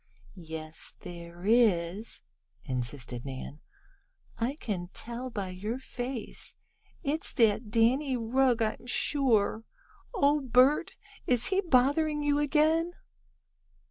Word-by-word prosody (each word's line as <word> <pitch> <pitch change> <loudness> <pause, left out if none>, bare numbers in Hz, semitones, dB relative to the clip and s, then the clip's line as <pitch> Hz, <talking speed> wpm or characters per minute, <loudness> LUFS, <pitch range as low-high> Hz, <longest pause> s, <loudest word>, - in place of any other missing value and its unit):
"Yes 160 -3 -8
there 170 +1 -9
is," 210 -3 +2 0.4
insisted 125 -1 -4
Nan. 135 +2 -7 0.8
"I 240 +5 0
can 195 - -4
tell 240 +2 -3
by 200 -5 -4
your 205 +6 -4
face. 250 -2 -6 0.5
It's 310 +2 0
that 220 -1 +3
Danny 250 +5 +2
Rugg; 245 0 +2
I'm 220 +2 -3
sure. 235 -5 +1 0.5
Oh, 300 -9 +3
Bert, 260 +3 +3 0.3
is 245 -2 +4
he 385 0 +2
bothering 295 0 +2
you 290 0 +2
again?" 315 +4 +2
235 Hz, 105 wpm, -29 LUFS, 185-280 Hz, 0.8 s, is